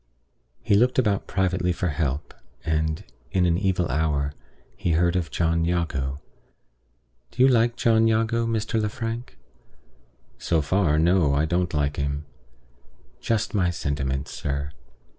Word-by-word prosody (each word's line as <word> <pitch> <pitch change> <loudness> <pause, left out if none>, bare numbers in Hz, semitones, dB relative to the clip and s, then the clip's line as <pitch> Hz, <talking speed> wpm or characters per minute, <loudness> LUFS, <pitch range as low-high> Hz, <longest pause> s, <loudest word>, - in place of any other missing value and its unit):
he - - +1
looked 120 +5 +3
about 105 -6 +1
privately 95 -1 0
for 90 +1 -1
help; 75 -2 -2 0.3
and, 80 0 0 0.3
in 90 +5 +2
an 85 -1 +3
evil 90 -2 +1
hour, 75 0 0 0.4
he 85 - -1
heard 85 +2 +2
of 85 -4 -1
John 85 +4 +1
Jago. 80 -6 -1 1.1
Do 125 - +1
you - - +8
like 120 -2 +3
John 115 -1 +3
Jago, 115 +1 +1
Mr. 110 0 0
Lefrank?" 115 - -4 1.0
"So 85 - +1
far, 75 0 +2
no. 80 -3 +3
I 75 +2 +2
don't 90 +2 0
like 75 0 0
him." 70 +1 -2 1.0
"Just 115 -2 -1
my 95 -4 +2
sentiments, 70 -4 -2
sir. 70 +1 -3
85 Hz, 135 wpm, -25 LUFS, 75-105 Hz, 1.1 s, you